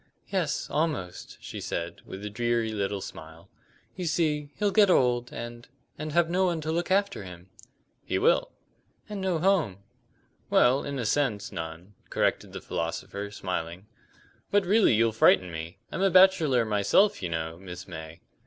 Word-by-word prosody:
"Yes, 180 Hz, -7 st, -1 dB
almost," 150 Hz, -, -3 dB
she -, -, -7 dB
said, 85 Hz, 0 st, -4 dB
with 95 Hz, +2 st, -7 dB
a -, -, -3 dB
dreary 120 Hz, 0 st, 0 dB
little 100 Hz, -1 st, -2 dB
smile. 80 Hz, +2 st, -10 dB, 0.4 s
"You 185 Hz, -, -4 dB
see, 155 Hz, -3 st, 0 dB
he'll 205 Hz, -1 st, +1 dB
get 205 Hz, -1 st, +5 dB
old, 125 Hz, -6 st, +2 dB
and 120 Hz, 0 st, -7 dB, 0.3 s
and 155 Hz, 0 st, -5 dB
have 170 Hz, +1 st, +3 dB
no 185 Hz, +3 st, +2 dB
one 170 Hz, -2 st, 0 dB
to 155 Hz, +1 st, -2 dB
look 170 Hz, +3 st, -1 dB
after 195 Hz, -, +1 dB
him." 90 Hz, 0 st, -12 dB, 0.5 s
"He -, -, -1 dB
will." -, -, +3 dB, 0.6 s
"And 210 Hz, -2 st, -5 dB
no 185 Hz, -3 st, 0 dB
home." 160 Hz, -, +2 dB, 0.7 s
"Well, 130 Hz, +3 st, +4 dB
in 140 Hz, -1 st, -4 dB
a 120 Hz, -, -2 dB
sense, 110 Hz, -4 st, 0 dB
none," 80 Hz, +4 st, -7 dB, 0.2 s
corrected -, -, 0 dB
the -, -, -7 dB
philosopher, 95 Hz, +5 st, -4 dB
smiling. 90 Hz, -2 st, -4 dB, 0.6 s
"But 205 Hz, -1 st, +2 dB
really 205 Hz, -, +4 dB
you'll 115 Hz, +1 st, +3 dB
frighten 95 Hz, -4 st, +4 dB
me. 80 Hz, +1 st, -6 dB
I'm -, -, -3 dB
a 195 Hz, -, +4 dB
bachelor 170 Hz, -10 st, +5 dB
myself, 110 Hz, -, +3 dB
you 90 Hz, -, -2 dB
know, 80 Hz, 0 st, -4 dB
Miss 90 Hz, -2 st, -9 dB
May." 80 Hz, -2 st, -9 dB
120 Hz, 160 wpm, -27 LUFS, -, 0.7 s, get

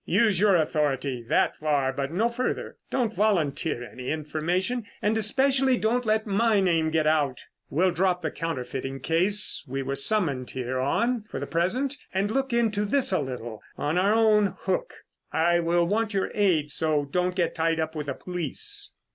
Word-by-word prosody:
Use 215 Hz, -6 st, +2 dB
your 200 Hz, -1 st, +5 dB
authority 145 Hz, -5 st, 0 dB
that 115 Hz, -, +1 dB
far, 145 Hz, -3 st, 0 dB
but 135 Hz, +1 st, -3 dB
no 210 Hz, +7 st, +2 dB
farther. 245 Hz, +2 st, -3 dB
Don't 240 Hz, -4 st, 0 dB
volunteer 170 Hz, -, 0 dB
any 125 Hz, +1 st, -7 dB
information 170 Hz, -, -1 dB, 0.2 s
and 210 Hz, +1 st, +1 dB
especially 265 Hz, +4 st, +2 dB
don't 235 Hz, +2 st, 0 dB
let 220 Hz, 0 st, +2 dB
my 215 Hz, +1 st, +2 dB
name 165 Hz, -4 st, +2 dB
get 160 Hz, -1 st, +1 dB
out. 150 Hz, -4 st, +1 dB, 0.3 s
We'll 180 Hz, +5 st, +2 dB
drop 180 Hz, 0 st, 0 dB
the 155 Hz, -, -1 dB
counterfeiting 135 Hz, -4 st, -4 dB
case 185 Hz, +6 st, +1 dB
we 135 Hz, +1 st, -3 dB
were 135 Hz, +1 st, -3 dB
summoned 140 Hz, -, +1 dB
here 130 Hz, 0 st, -3 dB
on 230 Hz, -, 0 dB
for -, -, -5 dB
the 140 Hz, -, -3 dB
present 245 Hz, -, -1 dB, 0.2 s
and 200 Hz, +2 st, +1 dB
look 270 Hz, +2 st, -1 dB
into 225 Hz, -3 st, +1 dB
this 255 Hz, +4 st, +1 dB
a 185 Hz, -, +2 dB
little 120 Hz, -5 st, -6 dB, 0.2 s
on 155 Hz, +5 st, 0 dB
our 200 Hz, +4 st, +3 dB
own 210 Hz, -4 st, +3 dB
hook. 190 Hz, -1 st, -1 dB, 0.4 s
I 170 Hz, +2 st, +3 dB
will 170 Hz, +1 st, +2 dB
want 215 Hz, +3 st, -1 dB
your 195 Hz, -, 0 dB
aid, 170 Hz, -8 st, +2 dB
so 155 Hz, -2 st, +1 dB
don't 180 Hz, +5 st, -1 dB
get 175 Hz, -3 st, 0 dB
tied 165 Hz, 0 st, 0 dB
up 160 Hz, 0 st, -2 dB
with 150 Hz, -2 st, -5 dB
the 140 Hz, -, -2 dB
police." 410 Hz, -, -3 dB
175 Hz, 175 wpm, -26 LUFS, 150-215 Hz, 0.4 s, your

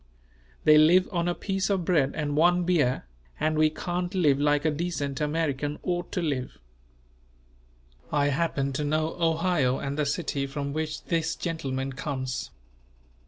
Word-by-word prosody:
They 150 Hz, 0 st, +7 dB
live 175 Hz, +4 st, +5 dB
on 170 Hz, -2 st, 0 dB
a 175 Hz, -, 0 dB
piece 195 Hz, -1 st, -2 dB
of 190 Hz, -4 st, 0 dB
bread 150 Hz, -6 st, +2 dB
and 145 Hz, -1 st, -2 dB
one 175 Hz, +3 st, +4 dB
beer, 155 Hz, -, +1 dB, 0.3 s
and 155 Hz, 0 st, +1 dB
we 155 Hz, 0 st, +4 dB
can't 175 Hz, +3 st, -3 dB
live 145 Hz, -7 st, +3 dB
like 145 Hz, +1 st, +2 dB
a 155 Hz, -, +3 dB
decent 150 Hz, -3 st, -3 dB
American 150 Hz, -1 st, -1 dB
ought 175 Hz, -1 st, -2 dB
to 180 Hz, -, -1 dB
live." 135 Hz, -5 st, -2 dB, 1.5 s
I 145 Hz, -1 st, +2 dB
happen 140 Hz, -2 st, 0 dB
to 150 Hz, -, -2 dB
know 155 Hz, +2 st, 0 dB
Ohio 165 Hz, -5 st, +2 dB
and 140 Hz, +2 st, -4 dB
the 150 Hz, -, +1 dB
city 140 Hz, -1 st, -1 dB
from 140 Hz, 0 st, -4 dB
which 155 Hz, 0 st, -3 dB
this 165 Hz, -1 st, -1 dB
gentleman 135 Hz, -5 st, -3 dB
comes. 130 Hz, -2 st, -4 dB
155 Hz, 155 wpm, -27 LUFS, 140-170 Hz, 1.5 s, They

